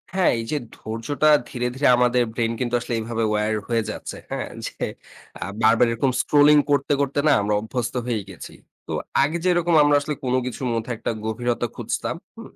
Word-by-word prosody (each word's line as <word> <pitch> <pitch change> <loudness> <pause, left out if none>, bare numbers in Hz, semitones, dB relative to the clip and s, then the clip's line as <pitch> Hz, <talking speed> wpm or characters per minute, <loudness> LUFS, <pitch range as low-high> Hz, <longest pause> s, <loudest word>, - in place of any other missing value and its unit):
হ্যাঁ, 190 - +4
এই - - -3
যে 150 - +1 0.2
ধৈর্যটা 115 +7 -1 0.2
ধীরে, 125 0 -2
ধীরে, 140 +2 +2
আমাদের 125 0 +3
ব্রেইন 115 -1 0
কিন্তু 120 -1 -2
আসলে 120 0 -5
এভাবে 115 0 -2
wired 105 0 0
হয়ে 115 -2 +1
যাচ্ছে। - - -7
হ্যাঁ? - - -3 0.2
যে - - -6 0.6
আ - - 0 0.2
বারবার 115 +2 +5
এরকম 125 +3 +1
স্ক্রোলিং 150 0 +5
করতে, 140 +1 +2
করতে, 140 0 0
না, - - +6
আমরা 105 +1 0
অভ্যস্ত 120 +2 -3
হয়ে 115 -4 -1
গিয়েছি। 95 -4 -10 0.3
তো - - -6 0.3
আগে 155 +4 0
যেরকম 175 -1 +2
আমরা 145 0 +4
আসলে 150 - -3
কোনো 125 0 +2
কিছুর 125 +1 -4
মধ্যে 115 +2 -3
একটা - - -2
গভীরতা 120 +2 -1
খুঁজতাম। 120 +6 -3 0.2
হুম? 230 - -10
120 Hz, 185 wpm, -23 LUFS, 115-145 Hz, 0.6 s, না